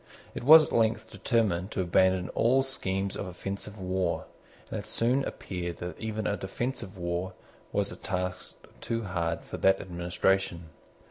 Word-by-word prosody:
It - - -5
was 155 +4 +10
at - - -5
length 110 -1 +1
determined 100 -7 +1
to 95 - -1
abandon 95 +1 +3
all 130 +4 +3
schemes 95 -7 -2
of 100 - -4
offensive 100 +3 -5
war; 90 -1 -1 0.5
and - - -2
it - - -8
soon 125 +4 +1
appeared 90 -2 -4
that 90 0 -6
even 110 -1 -3
a 100 - +1
defensive 100 +1 -4
war 90 +1 -2 0.4
was - - 0
a - - -7
task 90 -1 -4 0.2
too 115 0 -2
hard 85 -3 -1
for - - -7
that 95 0 +4
administration. 90 -1 0
95 Hz, 155 wpm, -29 LUFS, 90-110 Hz, 0.5 s, was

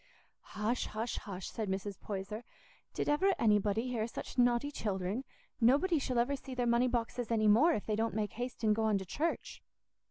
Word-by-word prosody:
"Hush, 220 +4 0
hush, 225 +2 -3
hush," 190 -2 -6
said 215 -3 -3
Mrs. 195 +1 -3
Poyser, 205 +2 -5 0.5
"did - - -1
ever 370 +7 +3
anybody 210 +1 +2
hear 225 -3 -1
such - - -7
naughty 245 +3 +3
children? 200 -1 -2 0.4
Nobody 290 +8 +4
shall 255 -2 -2
ever 245 +4 +2
see 265 -1 -8
their 245 -1 0
money 235 +1 +3
boxes 240 0 -2
any 220 -2 +2
more, 260 +12 +6
if 205 - -2
they 215 - 0
don't 225 0 -1
make 210 -2 -1
haste 245 0 -5
and 215 -1 +4
go 225 - -1
on 215 -2 +3
to 190 - -5
church." 315 - -3
230 Hz, 190 wpm, -33 LUFS, 210-250 Hz, 0.5 s, more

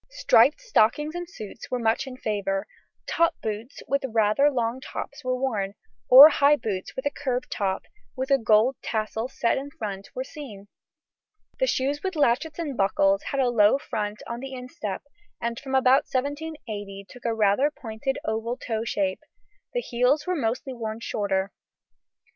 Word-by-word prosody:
Striped - - +4
stockings 300 - +2
and 350 0 -5
suits 215 - -9
were 250 - -1
much 230 +2 0
in 255 -1 -8
favour. 200 -3 -2 0.4
Top 335 0 +1
boots 220 +3 -5
with 280 0 0
rather 225 +3 +3
long 240 -2 -1
brown - - -21
tops 280 +2 -7
were 255 0 0
worn, 210 -7 -1 0.3
or 275 +4 +12
high 285 -1 +4
boots 205 -8 -4
with 260 - -5
a 285 - +1
curved 260 -3 -3
top, 190 -2 -1 0.3
with 260 +1 -3
a 275 - +5
gold 225 +3 +3
tassel 220 +1 -2
set 250 -1 0
in 280 +1 -7
front, 200 -7 -6
were 255 - -2
seen. 240 -9 -10 0.9
The - - +2
shoes 280 - 0
with 380 -2 -3
latchets 290 +2 +1
and 310 -6 -3
buckles 195 -1 +2
had 275 - -2
a 250 - +2
low 220 0 +5
front 210 -5 -4
on 235 0 -5
the 270 +1 -7
instep, 250 - -6 0.4
and 235 0 -3
from 265 -1 -4
about 265 +1 +5
1780 255 -8 -4
took 250 +3 -14
a 230 -1 0
rather 215 +6 +3
pointed 255 -1 -4
oval 225 +3 -2
toe 225 -2 -3
shape; 195 -4 -1 0.5
the - - -1
heels 250 - +1
were 365 0 0
mostly 255 -1 -2
worn 220 -2 -5
shorter. 195 -3 -1
245 Hz, 170 wpm, -25 LUFS, 215-280 Hz, 0.9 s, or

